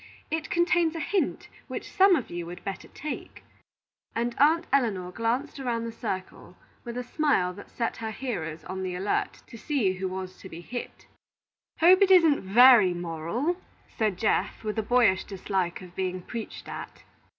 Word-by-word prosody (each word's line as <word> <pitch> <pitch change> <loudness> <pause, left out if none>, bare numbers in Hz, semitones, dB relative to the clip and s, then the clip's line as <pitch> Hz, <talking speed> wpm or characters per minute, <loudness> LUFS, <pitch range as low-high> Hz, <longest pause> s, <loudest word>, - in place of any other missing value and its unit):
It 320 0 -2
contains 345 -1 +2
a - - -3
hint 375 +6 -1 0.2
which - - -6
some 385 -1 +6
of 265 - -3
you 175 -1 -5
would 175 +1 -9
better 195 -1 -5
take;" 300 - -7 0.7
and 235 +1 0
Aunt 320 +4 +4
Elinor 200 -10 +1
glanced 240 +8 -2
around 235 -3 -2
the 230 - -4
circle 190 -5 -6 0.3
with 240 0 -6
a 250 - -2
smile 245 - +1
that 205 - -12
set 230 -1 -3
her 225 -1 -4
hearers 175 - -4
on 190 +3 -5
the 185 -1 -3
alert 195 +3 -2
to 230 - -12
see 240 -11 +1
who 190 0 -3
was 185 0 -6
to 190 - -10
be 165 0 -9
hit. 245 +7 -7 0.8
"Hope 365 +4 +7
it 395 - +6
isn't 330 -6 +6
very 210 -2 +7
moral," 175 - -2 0.3
said 215 -5 -1
Geoff, 215 +2 0
with 215 0 -2
a - - +2
boyish 220 -4 +3
dislike 185 -2 -3
of 180 -1 -12
being 185 -1 -2
preached 230 +2 -7
at. - - -8
225 Hz, 175 wpm, -27 LUFS, 185-275 Hz, 0.8 s, Hope